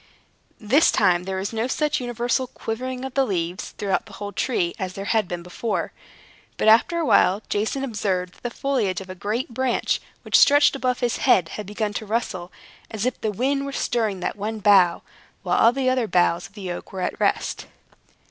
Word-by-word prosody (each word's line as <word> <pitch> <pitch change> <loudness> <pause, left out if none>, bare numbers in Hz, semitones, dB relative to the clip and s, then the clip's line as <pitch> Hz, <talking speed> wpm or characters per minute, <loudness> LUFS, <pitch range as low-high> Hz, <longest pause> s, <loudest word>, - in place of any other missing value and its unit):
This 265 +10 +4
time, 180 -3 +2
there 190 0 -3
was 195 +4 -3
no 225 +2 -1
such 300 +2 0
universal 245 +1 -1
quivering 255 +2 -5
of 265 - -6
the 275 - +3
leaves, 180 -5 -3
throughout 195 -2 -1
the - - -14
whole 205 0 -6
tree, 185 -7 -1
as 185 -1 -3
there 195 +1 -6
had 220 -2 +1
been 175 -1 -5
before. 180 +6 -3 0.7
But - - 0
after 235 +10 +5
a 335 - 0
while, 195 -5 +4
Jason 220 +6 -1
observed 195 -7 -2
that - - -23
the 245 - -3
foliage 235 -7 -1
of 190 -1 -9
a - - -5
great 215 +6 -3
branch 260 0 0 0.2
which - - +4
stretched 290 0 +6
above 255 -2 -1
his 240 -2 0
head 185 -10 +3
had 210 +2 -7
begun 210 0 -2
to 215 - -4
rustle, 200 -5 -2 0.4
as 220 0 -3
if 255 - -2
the 215 - 0
wind 275 +7 0
were 280 - -4
stirring 220 -8 -1
that - - -2
one 215 +2 -4
bough, 190 -4 +4 0.4
while - - +1
all 230 - +6
the 260 +1 -1
other 255 -3 +2
boughs 175 -2 +2
of 195 - -27
the 190 -3 -6
oak 175 - -7
were 190 - -5
at - - -3
rest. - - 0
220 Hz, 205 wpm, -23 LUFS, 190-255 Hz, 0.7 s, stretched